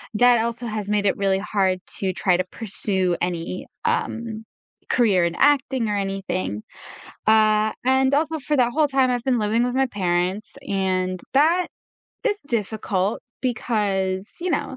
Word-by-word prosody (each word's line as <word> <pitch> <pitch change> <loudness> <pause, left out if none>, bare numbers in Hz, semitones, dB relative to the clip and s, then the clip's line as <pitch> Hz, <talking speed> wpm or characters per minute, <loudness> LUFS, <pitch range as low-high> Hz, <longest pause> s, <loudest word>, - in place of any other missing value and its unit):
that 245 +1 +5
also 235 +1 -3
has 210 -2 -4
made 205 -1 +1
it 195 - +3
really 195 -1 +2
hard 190 -3 0 0.2
to 190 -1 0
try 180 -1 +2
to 185 - +1
pursue 190 -4 -1
any, 175 +1 -3 0.2
um, 225 -1 -1 0.5
career 205 -8 +3
in 170 0 -2
acting 265 -5 +2
or 205 - 0
anything. 195 - -3 0.6
Uh, 215 0 +4
and 265 +1 +3
also 315 +2 +1
for 295 +2 0
that 245 -2 +3
whole 300 -1 +2
time, 265 -2 +2
I've 245 -1 -1
been 255 -3 +2
living 220 +3 +1
with 250 0 -1
my 265 0 +3
parents, 185 -1 -1
and 185 -2 0
that 330 +5 +4 0.6
is 415 -3 0
difficult 210 -4 -1 0.2
because, 200 -6 -1
you 360 0 -1
know, 265 - -2
215 Hz, 155 wpm, -23 LUFS, 190-250 Hz, 0.6 s, that